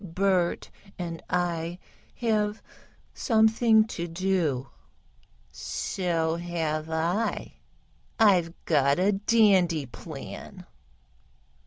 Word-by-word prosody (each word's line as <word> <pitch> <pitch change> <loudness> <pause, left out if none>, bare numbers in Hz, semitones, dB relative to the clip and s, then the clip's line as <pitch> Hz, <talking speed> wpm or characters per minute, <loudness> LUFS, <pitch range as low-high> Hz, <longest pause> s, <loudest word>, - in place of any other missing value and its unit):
"Bert 185 0 0 0.3
and 170 -2 -5
I 175 -1 -1 0.4
have 215 -2 0 0.5
something 220 -1 +4
to 175 -6 -5
do." 165 -7 -1 0.8
"So 165 - -2
have 160 -2 -3
I. 170 +7 -1 0.6
I've 185 -6 +4
got 140 -3 +3
a 190 +3 +3
dandy 195 -7 +3
plan." 125 - -9
175 Hz, 75 wpm, -27 LUFS, 165-205 Hz, 0.8 s, something